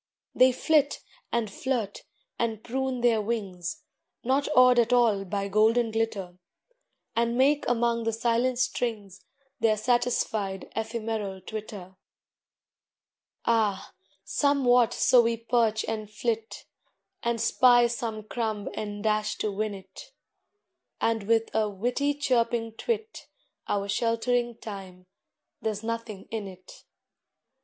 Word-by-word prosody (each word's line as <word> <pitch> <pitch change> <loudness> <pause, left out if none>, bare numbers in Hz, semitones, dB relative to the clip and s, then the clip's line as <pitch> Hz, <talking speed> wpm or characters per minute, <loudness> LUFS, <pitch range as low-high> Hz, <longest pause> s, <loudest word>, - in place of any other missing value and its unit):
They 255 0 +6
flit, 290 +3 +1 0.3
and 235 -2 0
flirt, 230 -4 -3 0.3
and 225 -2 -1
prune 260 0 -2
their 235 -3 +3
wings, 205 - -4 0.4
Not 270 +3 +1
awed 250 -1 +7
at 235 +1 +2
all 225 -5 +3
by 200 +1 -2
golden 220 +3 +3
glitter, 200 -5 -2 0.8
And 235 +1 +1
make 285 +3 +3
among 235 -1 +1
the 225 - +1
silent 235 +2 +1
strings 225 -6 -2 0.4
Their 220 -2 +3
satisfied 215 -4 0
ephemeral 220 -3 -3
twitter. 200 -2 -8 1.5
Ah, 215 -4 +1 0.3
somewhat 250 -5 +3
so 250 - +5
we 230 0 0
perch 230 -1 +1
and 215 -2 -4
flit, 220 +1 -3 0.6
And 235 0 -1
spy 240 +1 +5
some 230 -2 -3
crumb 215 -2 -3
and 205 -1 -5
dash 215 0 +1
to 215 - -2
win 210 +1 -2
it, 190 - -13 0.9
And 225 -3 0
with 225 0 +2
a 215 -1 +1
witty 245 +8 -1
chirping 235 -5 0
twit 440 - -4 0.4
Our 200 -1 -1
sheltering 235 +2 0
Time 190 -4 -9 0.6
there's 215 -1 -3
nothing 230 -3 -5
in 220 -3 -3
it! 185 -1 -13
225 Hz, 115 wpm, -27 LUFS, 210-240 Hz, 1.5 s, awed